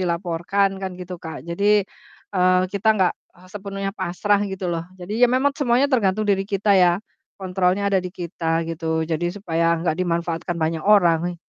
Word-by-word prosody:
dilaporkan 175 +2 0
kan 190 -1 -3
gitu, 180 0 -6
Kak. 160 -1 -7
Jadi, 170 +4 -2 0.7
eee, 185 0 +4
kita 200 +2 0
nggak, 185 -3 +3 0.2
ah, 180 +1 -18
sepenuhnya 195 -1 -5
pasrah 200 +3 +1
gitu 190 -1 -6
loh. 165 -1 -2
Jadi 180 +2 -8
ya - - +9
memang 270 +3 +2
semuanya 250 -1 +3
tergantung 215 -3 +2
diri 195 -2 +1
kita 200 0 +1
ya, 180 -3 +5 0.4
kontrolnya 185 +1 0
ada 190 - +3
di 180 - -5
kita 170 -2 -2
gitu, 160 -1 -2
jadi 160 +1 -2
supaya 170 -3 0
nggak 170 - +2
dimanfaatkan 170 -1 -2
banyak 160 0 -1
orang. 175 -3 +3
180 Hz, 165 wpm, -22 LUFS, 170-200 Hz, 0.7 s, ya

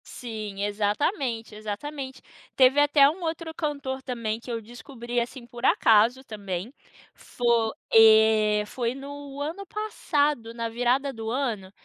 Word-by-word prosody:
Sim, 215 -4 -6
exatamente, 225 - -1
exatamente. 260 +6 -6 0.3
Teve 265 +2 +5
até 290 -1 +6
um 325 +6 -2
outro 325 -1 -4
cantor 280 -4 -3
também, 230 -4 -3
que 240 - -8
eu 230 - -2
descobri, 240 +1 -5
assim, 240 +1 -7
por 240 0 -11
acaso 230 +2 +4
também. 205 -1 -6 0.4
Fo 235 -2 0 0.2
eh, 220 -1 +6
foi 235 +2 -3
no 280 0 -9
ano 325 +7 -4
passado, 295 - -1
na 230 -1 -3
virada 245 +4 0
do 225 -1 -5
ano, 230 -7 -2
240 Hz, 130 wpm, -26 LUFS, 220-280 Hz, 0.4 s, até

